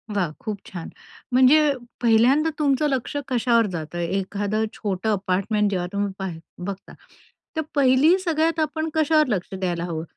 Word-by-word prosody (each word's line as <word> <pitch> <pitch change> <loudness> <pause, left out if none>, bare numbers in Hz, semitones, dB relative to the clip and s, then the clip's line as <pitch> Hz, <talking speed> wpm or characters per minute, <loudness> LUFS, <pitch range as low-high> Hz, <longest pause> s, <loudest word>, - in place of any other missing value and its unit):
वाह! 180 -6 0
खूप 215 -3 -4
छान. 175 -3 -7 0.4
म्हणजे 285 +3 +5 0.3
पहिल्यांदा 245 +7 +4
तुमचं 290 0 +2
लक्ष 265 +1 -2
कशावर 235 -2 +2
जातं? 165 0 -5
एखादं 200 +4 -1
छोटं 205 0 -3
अपार्टमेंट 200 +2 0
जेव्हा 180 -2 -1
तुम्ही 200 -1 -1
पाह 190 -2 -3 0.3
बघता, 195 -1 -7 0.6
तर - - +2
पहिली 280 +6 +5
सगळ्यात 330 -2 0
आपण 315 +1 -1
कशावर 310 -1 +3
लक्ष 195 -3 -2
द्यायला 175 -3 -2
हवं, 165 -2 -4
220 Hz, 140 wpm, -23 LUFS, 190-290 Hz, 0.6 s, म्हणजे